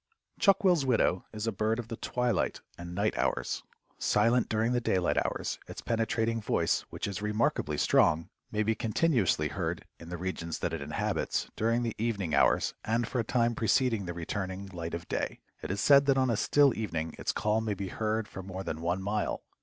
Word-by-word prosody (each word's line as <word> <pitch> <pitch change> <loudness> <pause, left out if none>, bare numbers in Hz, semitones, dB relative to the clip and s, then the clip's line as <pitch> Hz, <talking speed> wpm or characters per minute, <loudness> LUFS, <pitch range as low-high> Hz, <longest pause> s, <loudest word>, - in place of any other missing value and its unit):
Chuck 200 -1 +4
will's 175 -6 +4
widow 115 -8 +2
is 110 0 -4
a 115 - +1
bird 110 +2 0
of 120 -2 -5
the 115 - -3
twilight 125 -3 -1
and 85 0 -8
night 100 +3 +1
hours. - - 0 0.4
Silent 115 +3 +3
during 110 +2 +1
the 120 -1 +1
daylight 90 -6 +1
hours, - - -3
its - - -7
penetrating 115 0 0
voice, - - +1
which - - -4
is 100 -1 -4
remarkably 105 -8 0
strong, 80 +2 +3 0.2
may 105 0 +1
be 110 +1 +2
continuously 115 - +1
heard - - -3
in 85 - -10
the 90 - -4
regions 85 -2 -3
that - - -2
it - - -3
inhabits 75 +1 -2
during 115 +2 +1
the 115 -2 -1
evening 100 -8 -1
hours 70 - +3
and 115 +1 0
for 125 - -2
a - - +2
time 120 +1 +1
preceding 115 -1 +2
the 85 - -3
returning 95 +3 -4
light 85 -1 -4
of 85 - -7
day. - - -2 0.2
It - - -5
is 100 +2 -2
said 140 +4 +6
that 135 -1 +4
on 130 -2 +3
a - - +2
still 140 +5 +4
evening 80 -7 -3
its - - 0
call 105 +1 +1
may 110 -2 -1
be 95 -1 -4
heard 110 +1 -1
for 95 - -8
more 95 0 -6
than 80 -3 -4
one 90 +3 -1
mile. 105 +2 -1
110 Hz, 200 wpm, -30 LUFS, 95-115 Hz, 0.4 s, said